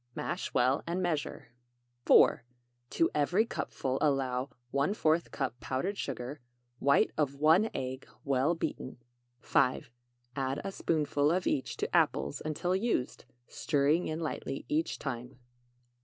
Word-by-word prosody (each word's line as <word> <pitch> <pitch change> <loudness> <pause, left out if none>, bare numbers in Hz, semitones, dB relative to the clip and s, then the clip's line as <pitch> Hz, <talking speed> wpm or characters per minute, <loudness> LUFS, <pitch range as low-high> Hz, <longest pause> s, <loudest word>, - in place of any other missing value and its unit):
Mash - - -3
well 130 +3 +2
and 175 +2 -1
measure. 160 -9 -2 0.6
4. - - +6 0.5
To 165 - +1
every 175 +9 +2
cupful, 135 - -3
allow 135 -3 +1 0.2
¼ 155 +3 +1
cup 130 -3 -3
powdered 135 +13 -2
sugar, 135 -4 -5 0.4
white 140 0 +3
of 140 -2 +1
1 160 +9 +4
egg, 130 0 -4 0.2
well 140 +4 +2
beaten. 130 -5 -4 0.4
5. 130 -3 +1 0.4
Add 135 +1 -1
a 195 - -3
spoonful 150 -5 +1
of 180 +1 0
each 130 - -1
to - - -2
apples 70 - +1
until 165 +4 -1
used, 190 - -1 0.2
stirring 150 +3 +1
in 155 +1 -3
lightly 150 -4 -4
each 310 +2 0
time. 125 -3 -6
145 Hz, 125 wpm, -31 LUFS, 130-165 Hz, 0.6 s, 4